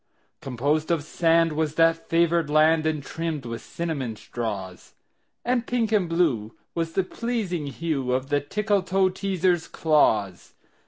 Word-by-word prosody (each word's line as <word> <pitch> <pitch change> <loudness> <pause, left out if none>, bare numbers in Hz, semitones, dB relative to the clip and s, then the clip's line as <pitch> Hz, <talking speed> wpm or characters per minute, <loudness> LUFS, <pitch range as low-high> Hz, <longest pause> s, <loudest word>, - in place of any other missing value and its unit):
Composed 145 +5 -1
of 165 -4 +1
sand 165 0 +2
was 155 0 -1
that 165 0 +2
favored 170 -1 +2
land, 155 +1 +4
And 155 -3 -1
trimmed 160 -2 -4
with 115 -1 -5
cinnamon 145 -9 -4
straws; 100 -6 -6 0.5
And 245 -1 0
pink 235 -3 0
and 200 -6 +2
blue 140 -11 0 0.2
was 165 -1 -2
the 190 - +2
pleasing 195 -8 -3
hue 140 -3 -2
Of 130 +2 -1
the 145 0 +2
Tickletoeteaser's 190 -1 0
claws. 110 - +1
160 Hz, 130 wpm, -25 LUFS, 140-175 Hz, 0.5 s, land